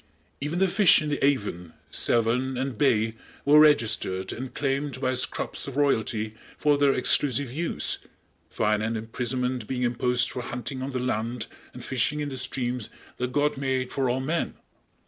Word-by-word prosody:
Even 150 +4 -2
the 190 +1 +4
fish 190 0 +6
in 155 - -3
the 145 - -2
Avon, 100 - 0 0.2
Severn 120 +3 +1
and 130 -1 -2
Bay 110 -3 +2 0.3
were 150 +2 +7
registered 110 -10 +3
and 130 +2 -6
claimed 140 0 -2
by 130 -1 0
scrubs 130 - -2
of 140 0 -6
royalty 110 -6 +1 0.2
for 150 -1 +3
their 140 -1 +4
exclusive 140 -2 +2
use, 165 +4 -1 0.5
fine 105 -1 +1
and 110 +1 -1
imprisonment 125 +1 -2
being 125 -1 -2
imposed 125 0 +2
for 125 - -4
hunting 125 +2 -5
on 130 - -3
the 130 - -2
land 120 -2 -2 0.3
and - - -10
fishing 130 +4 0
in 145 -1 -2
the 135 - -5
streams 125 -2 -2 0.3
that 125 0 -2
God 145 +1 +1
made 130 -2 -1
for 135 -2 0
all 130 +2 0
men. 160 +6 -1
130 Hz, 165 wpm, -26 LUFS, 120-140 Hz, 0.5 s, were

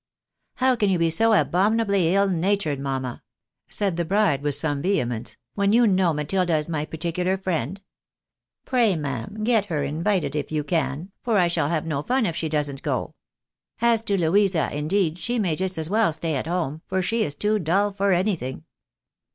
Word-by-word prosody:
" - - -56
How 260 0 +3
can 210 -4 +1
you 185 - +2
be 165 -1 +2
so 225 +8 +3
abominably 200 -2 +2
ill 200 0 +3
natured, 185 -4 0
mamma? 130 -3 -3 0.3
" - - -64
said 195 -5 +1
the 170 - +1
bride 195 -5 +1
with 145 -1 +2
some 145 -3 -1
vehemence, 125 - -1
" 120 - -62
when 200 +1 +1
you 240 +1 +5
know 190 -4 +3
Matilda 165 +3 0
is 150 - -3
my 155 -3 -2
particular 175 +4 -2
friend? 185 -2 -2 0.9
Pray 235 -7 +2
ma'am, 145 - -4
get 220 -3 +2
her 160 -7 -2
invited 160 +2 -1
if 150 -1 -3
you 155 -1 -1
can, 160 +3 -2
for 230 -3 +1
I 180 -2 +4
shall 170 -4 0
have 160 -2 -1
no 150 -3 -2
fun 250 - +1
if 170 - -2
she 165 -2 -2
doesn't 145 -3 -2
go. - - -2 0.7
As 235 -1 +3
to 200 - +1
Louisa, 180 -1 +2
indeed, 165 +3 0
she 240 +7 -2
may 185 -8 0
just 185 +1 -2
as 160 -1 -1
well 215 -1 +2
stay 160 +1 -3
at 135 - -3
home, 160 -3 -2
for 190 0 -1
she 225 +4 0
is 145 - -3
too 210 +5 +1
dull 195 +4 +1
for 200 0 0
anything." 175 - -1
175 Hz, 195 wpm, -24 LUFS, 150-200 Hz, 0.9 s, you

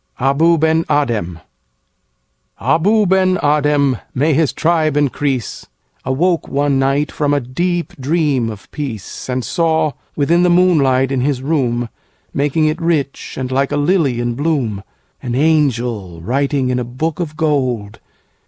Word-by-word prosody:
Abou 155 +6 +3
Ben 160 +1 +2
Adhem 115 - 0 1.2
ABOU 210 +6 +2
BEN 185 0 +3
ADHEM 145 -3 +2 0.2
(may 150 +4 +2
his 155 0 +2
tribe 160 -3 +1
increase!)Awoke 140 - -2
one 140 -1 +1
night 135 +2 +1
from 145 -1 0
a - - +2
deep 170 +8 -2
dream 140 -4 0
of 105 -3 -10
peace, 130 -6 -6
And 125 -1 -2
saw—within 160 -1 0
the 180 - +3
moonlight 140 -8 +3
in 135 -2 0
his 135 -1 -1
room, 125 -5 0 0.5
Making 145 +2 +1
it 155 +2 -1
rich 155 -5 -1
and 130 -1 -4
like 135 +1 0
a - - 0
lily 145 -5 +1
in 120 0 -1
bloom—An 125 -3 -4
angel, 120 - 0
writing 135 - 0
in 125 - 0
a - - -2
book 145 +7 -3
of 155 -3 -4
gold. 130 -10 -1
145 Hz, 135 wpm, -17 LUFS, 125-160 Hz, 1.2 s, Abou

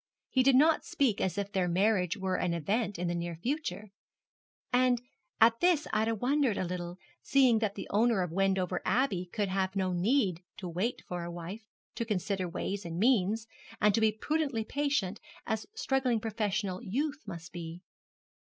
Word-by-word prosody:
He 260 - +4
did 265 0 +5
not 310 +4 +5
speak 250 -8 +1
as 185 -1 -1
if 200 0 -2
their 185 -2 +1
marriage 180 0 +2
were 190 -1 -1
an 175 -2 0
event 205 +5 -1
in 175 +1 -2
the 170 - 0
near 170 0 -3
future; 235 - -3 0.8
and 250 -1 +4 0.4
at 230 +1 +6
this 345 -4 +3
Ida 220 +1 +2
wondered 255 0 +1
a - - 0
little, 175 0 -5 0.2
seeing 255 -5 +4
that 210 -2 -1
the 200 - -5
owner 215 -2 +3
of 180 - -4
Wendover 190 -1 +1
Abbey 195 -5 +1
could 205 -3 -1
have 190 0 -1
no 185 -2 0
need 190 -1 +1 0.2
to 185 - -6
wait 185 +8 -2
for 175 -1 -4
a 170 - -5
wife 175 +5 -6 0.3
to 235 - -2
consider 195 -4 -1
ways 195 +3 -3
and 170 -1 -5
means 220 0 +2 0.3
and 210 0 +4
to 225 - +2
be 220 -1 +5
prudently 275 +1 -1
patient, 280 -8 -1 0.3
as 220 -1 -2
struggling 270 - +1
professional 210 -3 -2
youth 290 +8 -2
must 170 0 -7
be. 170 +1 -7
205 Hz, 175 wpm, -31 LUFS, 180-240 Hz, 0.8 s, at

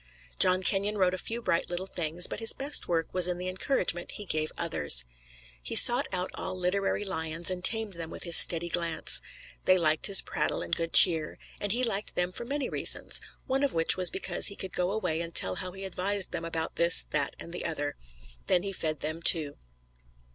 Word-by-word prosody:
John 185 0 +4
Kenyon 200 +2 0
wrote 185 -2 +1
a - - -4
few 230 +5 -6
bright 170 - -1
little 175 +1 -4
things, 170 -2 0
but - - -4
his 225 -1 +4
best 280 +2 +2
work 165 -2 -3
was 180 -1 +3
in 180 -1 -3
the 180 +1 -6
encouragement 185 -2 -2
he 210 - -7
gave 155 -3 -3
others. 75 - +1 0.6
He - - -5
sought 245 +4 +8
out 185 0 -2
all 185 - -7
literary 195 +3 -2
lions 165 -1 -2
and 180 -1 -6
tamed 220 0 +2
them 165 -2 -8
with - - -5
his 170 -2 +3
steady 170 0 +5
glance. 170 -1 0 0.4
They 185 - +4
liked 155 -3 +1
his 200 -2 +6
prattle - - -3
and - - -2
good 165 0 -4
cheer, 160 -4 +5 0.2
and 205 - -3
he 245 +4 0
liked 215 -3 -2
them 180 0 -2
for 235 - -8
many 275 +1 -4
reasons - - 0 0.2
one 265 0 -2
of 280 -2 -1
which 165 0 +3
was 185 -1 +3
because 190 - +2
he 200 - -3
could 190 -2 -9
go 180 0 -2
away 170 -6 -3
and 170 -1 -9
tell 95 - +3
how 185 - -6
he 190 +1 -9
advised 190 +1 -3
them 165 -1 -6
about 165 -1 -5
this, 170 0 +4
that 150 -2 -2
and 170 - -11
the - - -6
other. 145 -3 -4 0.5
Then 175 - +1
he 200 -1 -5
fed 155 -5 -5
them, 155 +2 -5
too. 155 -4 +3
180 Hz, 210 wpm, -27 LUFS, 165-195 Hz, 0.6 s, sought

